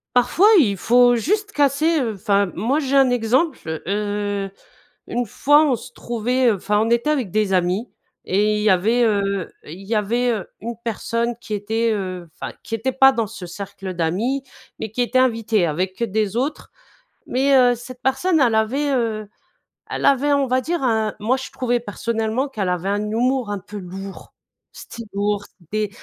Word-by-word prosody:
Parfois, 335 - +4
il 200 -7 +2
faut 245 +4 +4
juste 415 - 0
casser, 300 +1 +2
heu 230 -4 -1
enfin 200 +1 +1
moi, 245 - 0
j'ai 275 -2 -1
un 265 -2 +5
exemple. 250 +6 +1
Je 160 0 -4 0.7
heu, - - -10 0.6
une 245 -1 -1
fois 290 +8 +4
on 255 - +3
se - - -8
trouvait, 245 +2 -1
heu - - +2
enfin, 210 +2 0
on 225 - +1
était 235 +5 +2
avec 255 - -1
des 215 -3 +1
amis 185 +5 0 0.3
et 210 +3 +1
il - - -2
y 215 - +4
avait, 220 +7 +3
heu, 200 -4 0
il 175 +6 -10
y 215 +3 -2
avait, 240 +4 +1
heu, 210 -6 -3
une 230 +1 -5
personne 230 +1 -1
qui 215 - -9
était, 220 +3 0
heu 185 -4 -4
enfin, - - -7
qui 225 -4 -3
était 260 +4 -2
pas 270 +1 +6
dans 230 -4 -1
ce 185 - -9
cercle 195 +1 -7
d'amis, 205 +12 -1 0.3
mais 220 -1 -5
qui 245 - 0
était 255 +2 +1
invitée 225 -6 +2
avec, 185 +6 -2
heu, 235 - +1
des 210 +1 -1
autres. 280 +5 -2 0.6
Mais 270 +2 +2
heu, 245 -1 +5
cette 245 +1 -11
personne 310 +6 +2
elle 240 -5 +3
avait, 265 +7 +1
heu, 220 -4 -1 0.6
elle - - -4
avait, 280 +1 +3
on 280 -1 +2
va 255 +1 +1
dire 340 +4 -2
un 220 -3 +1
moi, 235 +5 +1
je 260 - -7
trouvais 245 -2 -1
personnellement 225 +4 -2
qu'elle 205 -8 -3
avait 180 +2 -1
un 205 +1 0
humour 240 +2 0
un 205 - -2
peu 205 +2 -9
lourd. 195 +1 -9 0.4
C'était 230 -1 -9
lourd, 205 0 0 0.2
c'était, 210 +5 -2
225 Hz, 190 wpm, -21 LUFS, 205-255 Hz, 0.7 s, pas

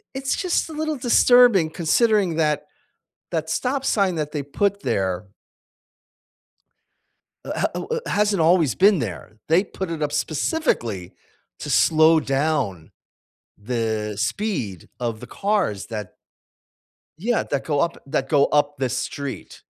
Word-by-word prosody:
it's 270 0 -1
just 360 -3 -1
a - - -8
little 310 0 -2
disturbing 245 -7 +5
considering 185 +1 +2
that 150 -2 +1 0.6
that 160 -1 -2
stop 270 +2 -1
sign 195 -8 +2
that 150 -1 -3
they 150 - -2
put 200 +8 -1
there 95 0 -1 2.2
eh, - - -7
h - - -1
eh, - - +3
eh, - - -2 0.2
it - - -7
hasn't 205 -3 +1
always 165 -3 +3
been 195 0 +5
there, 105 - -6
they 165 +4 +4
put 190 -3 -6
it 160 -2 -4
up 145 0 -1
specifically 145 - -1 0.5
to - - -5
slow 160 0 +5
down 135 - -1 0.7
the 110 -1 -2
speed 125 - -3
of 115 -3 -3
the 125 - -10
cars 195 - -1
that 105 -4 -6 1.1
Yeah, 230 +5 0
that 140 -2 -3
go 145 -3 0
up 170 0 -1
that 135 0 -2
go 140 -1 +4
up 145 -1 +1
the 130 -1 0
street- 140 +1 -5
155 Hz, 140 wpm, -22 LUFS, 125-200 Hz, 2.2 s, disturbing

